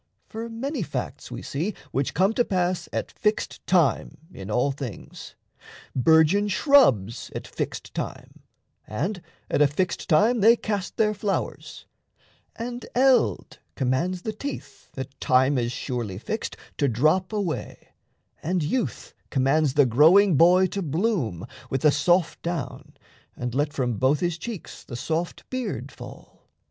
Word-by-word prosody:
For 230 +1 -6
many 260 +4 -3
facts 175 - -5
we - - -7
see 170 +9 -3 0.2
which 135 0 -1
come 190 +5 +3
to 245 - +2
pass 185 -4 -1
At - - -3
fixed 215 -1 -2
time 170 - +2 0.2
in 95 +1 -8
all 125 +6 +1
things: 135 -5 -8 0.6
burgeon 160 - +4
shrubs 190 - +3
At - - -5
fixed - - -5
time, - - -6 0.5
and 175 - -3 0.3
at - - 0
a 145 - +7
fixed 180 +6 -2
time 215 +9 +4
They 225 +3 +7
cast 205 -5 -4
their 215 -1 +3
flowers; 205 -1 -4 0.7
and 240 +1 -5
Eld 260 0 +2 0.2
commands 150 +8 -1
the 220 - -3
teeth, 215 - -7
At 130 +1 -7
time 130 +1 +3
as 120 0 -1
surely 120 -7 -4
fixed, 215 - -4 0.2
to 140 - +3
drop 155 - +2
away, 200 -7 -4 0.5
And 175 +1 0
Youth 230 - -2 0.2
commands 140 +1 +2
the 145 -2 +6
growing 160 - +6
boy 180 +5 +6
to 200 - -3
bloom 155 - -1 0.2
With 135 - -1
the 150 - +5
soft 170 +4 +2
down 165 -7 -5 0.4
and 125 -1 -4
let 145 +3 0
from 125 -6 -2
both 135 +3 +3
his 175 -1 -1
cheeks 225 -3 -7
The 120 - -8
soft 165 +7 -3
beard 255 -2 -4
fall. - - -13
165 Hz, 145 wpm, -25 LUFS, 135-205 Hz, 0.7 s, a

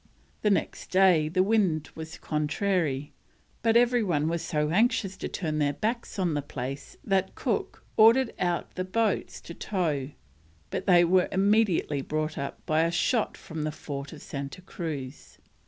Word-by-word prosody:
The 210 - +3
next 200 - -1
day 180 -5 +4
the 185 +3 +2
wind 190 -7 +1
was 160 0 -8
contrary, 150 -2 -1 0.5
but 230 0 +4
every 245 0 +4
one 160 -7 +1
was 170 0 -1
so 150 -2 -1
anxious 215 -1 +2
to - - -4
turn 155 -4 -2
their 145 -1 +2
backs 225 - -3
on 180 -4 +1
the 145 - 0
place 135 0 -6
that 190 -1 0
Cook - - -2
ordered 230 +3 +6
out 175 -1 -1
the 185 - -2
boats 210 +2 -1
to 170 - -9
tow, 160 -10 -1 0.6
but - - -3
they 175 -2 +6
were 180 +1 +3
immediately 195 -7 +2
brought 155 +2 -2
up 140 - -6
by 155 +1 +2
a 165 - +2
shot 215 +6 0
from 160 -1 -7
the 155 0 -1
fort 140 -2 -6
of 155 - -11
Santa 140 +5 -6
Cruz. 150 -7 -6
170 Hz, 165 wpm, -27 LUFS, 150-200 Hz, 0.6 s, ordered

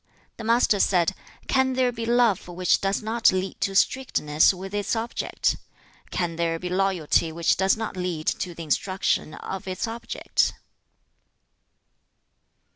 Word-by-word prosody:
The 230 - -7
Master 230 -2 +3
said, 180 -1 +3 0.3
'Can 265 -1 +2
there 255 -1 +2
be 230 -1 -5
love 235 -6 +3
which 180 +1 +1
does 195 +2 0
not 225 +1 +3
lead 185 +1 -3
to 195 - -1
strictness 160 - +3
with 190 +1 -8
its 205 +2 -1
object? 230 +1 -1 0.5
Can 170 -2 -2
there 165 -1 0
be 180 +2 -5
loyalty 180 -4 +1
which 165 +1 +2
does 190 +3 +2
not 220 -3 -4
lead 180 -4 -3
to 175 -2 -2
the 165 - -7
instruction 165 0 0
of 190 0 -6
its 185 +4 -2
object?' 235 +1 -1
195 Hz, 140 wpm, -25 LUFS, 175-225 Hz, 0.5 s, Master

